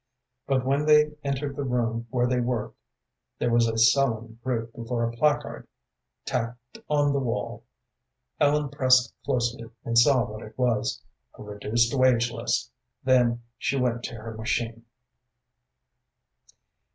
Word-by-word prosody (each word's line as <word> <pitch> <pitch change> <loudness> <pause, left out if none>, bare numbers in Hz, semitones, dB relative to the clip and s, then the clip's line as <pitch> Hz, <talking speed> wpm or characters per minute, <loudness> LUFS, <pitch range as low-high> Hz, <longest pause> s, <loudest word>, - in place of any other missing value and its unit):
But 130 -2 +1
when 140 +3 +1
they 150 0 +6
entered 140 0 -2
the 140 - -3
room 120 -2 -1
where 125 0 +1
they 125 0 +1
worked, 120 -3 -2 0.6
there 120 - 0
was 115 0 +4
a 115 0 -2
sullen 115 -1 +2
group 115 -3 -2
before 115 0 -3
a - - -3
placard 150 +5 0 0.6
tacked 120 +1 -4
on 145 -1 +2
the 140 - +1
wall. 120 -4 -3 0.7
Ellen 145 0 +2
pressed 130 -3 +3
closely, 120 -2 -1 0.2
and 115 - -2
saw 125 +1 +5
what 110 +1 -8
it 110 - -12
was 120 -4 0 0.3
a - - -9
reduced 105 +4 0
wage 125 -3 +3
list. 115 +1 -2 0.3
Then 120 -2 +3 0.2
she 140 - 0
went 120 -2 0
to - - -6
her 110 0 -8
machine. 115 +1 -3
120 Hz, 140 wpm, -26 LUFS, 115-130 Hz, 0.7 s, they